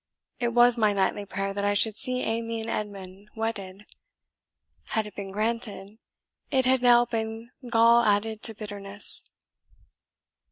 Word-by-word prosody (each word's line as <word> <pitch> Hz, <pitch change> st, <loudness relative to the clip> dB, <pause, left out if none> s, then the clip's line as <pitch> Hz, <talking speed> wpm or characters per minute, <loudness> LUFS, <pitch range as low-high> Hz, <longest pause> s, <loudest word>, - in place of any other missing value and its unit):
It 240 Hz, -, 0 dB
was 240 Hz, 0 st, +5 dB
my 215 Hz, -2 st, +3 dB
nightly 200 Hz, +1 st, 0 dB
prayer 195 Hz, 0 st, -3 dB
that 200 Hz, 0 st, -3 dB
I 205 Hz, 0 st, +1 dB
should 215 Hz, +1 st, +3 dB
see 255 Hz, +1 st, -1 dB
Amy 230 Hz, 0 st, -2 dB
and 225 Hz, -, -5 dB
Edmund 200 Hz, -1 st, -6 dB
wedded, 210 Hz, -3 st, -5 dB, 1.0 s
had 220 Hz, -1 st, -1 dB
it 210 Hz, -, -10 dB
been 200 Hz, -1 st, -6 dB
granted, 215 Hz, 0 st, -3 dB, 0.5 s
it 260 Hz, -1 st, +2 dB
had 260 Hz, 0 st, +3 dB
now 240 Hz, -1 st, +5 dB
been 225 Hz, 0 st, -5 dB, 0.2 s
gall 235 Hz, 0 st, +5 dB
added 215 Hz, +1 st, 0 dB
to 225 Hz, -, -1 dB
bitterness." 205 Hz, -1 st, -1 dB
220 Hz, 145 wpm, -26 LUFS, 205-230 Hz, 1.0 s, was